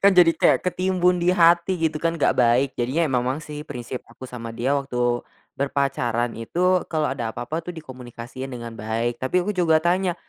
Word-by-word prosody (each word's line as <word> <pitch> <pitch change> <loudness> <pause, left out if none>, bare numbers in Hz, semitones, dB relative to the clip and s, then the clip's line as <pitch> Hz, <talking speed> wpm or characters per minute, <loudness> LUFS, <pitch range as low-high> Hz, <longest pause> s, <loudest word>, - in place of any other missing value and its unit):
Kan 200 0 +6
jadi 175 -2 +7
kayak - - +4
ketimbun 180 -1 +1
di 175 +1 +2
hati 170 +1 +4
gitu 160 -1 +1
kan 165 +1 0
gak 165 - +1
baik, 125 +2 +3
jadinya 130 +7 0
ya - - -4
memang 130 +2 0
sih 150 0 -8
prinsip 125 -2 -6
aku 115 - -18
sama 115 -2 -7
dia 120 +3 -1
waktu, 125 -3 0 0.4
berpacaran 130 -4 0
itu 180 +10 +1
kalo 155 -3 -1
ada 120 -4 -3
apa-apa 150 +7 -4
tuh 180 - -5
dikomunikasiin 130 -3 -8
dengan 120 -3 -8
baik 115 +3 -2
tapi 155 +8 +1
aku 200 - -2
juga 165 -5 +2
tanya, 180 +1 +1
140 Hz, 185 wpm, -23 LUFS, 120-170 Hz, 0.4 s, jadi